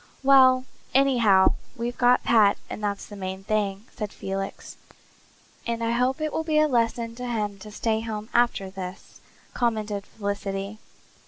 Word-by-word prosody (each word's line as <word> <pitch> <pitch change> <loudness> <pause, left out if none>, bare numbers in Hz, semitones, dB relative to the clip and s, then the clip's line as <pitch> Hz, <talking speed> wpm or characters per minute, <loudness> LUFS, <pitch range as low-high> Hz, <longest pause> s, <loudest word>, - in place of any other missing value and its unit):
"Well, 260 -1 +6 0.3
anyhow, 235 -8 +5 0.2
we've 240 0 -3
got 245 0 +4
Pat 210 -3 +4
and 210 - -6
that's 200 -1 -2
the 205 - -10
main 190 -1 -5
thing," 205 -1 -1
said 210 -2 -4
Felix. 195 0 -5 0.9
"And 230 0 -2
I 230 - +1
hope 250 +4 +1
it 310 -1 -2
will 320 - -1
be 310 -1 0
a 305 0 +5
lesson 230 -3 0
to 250 0 -5
him 210 -4 -2
to 210 - -10
stay 220 +1 -1
home 215 -1 -5
after 235 -5 +2
this," 185 -1 -9 0.3
commented 215 -4 -1
Felicity. 200 0 -4
220 Hz, 155 wpm, -25 LUFS, 200-245 Hz, 0.9 s, Well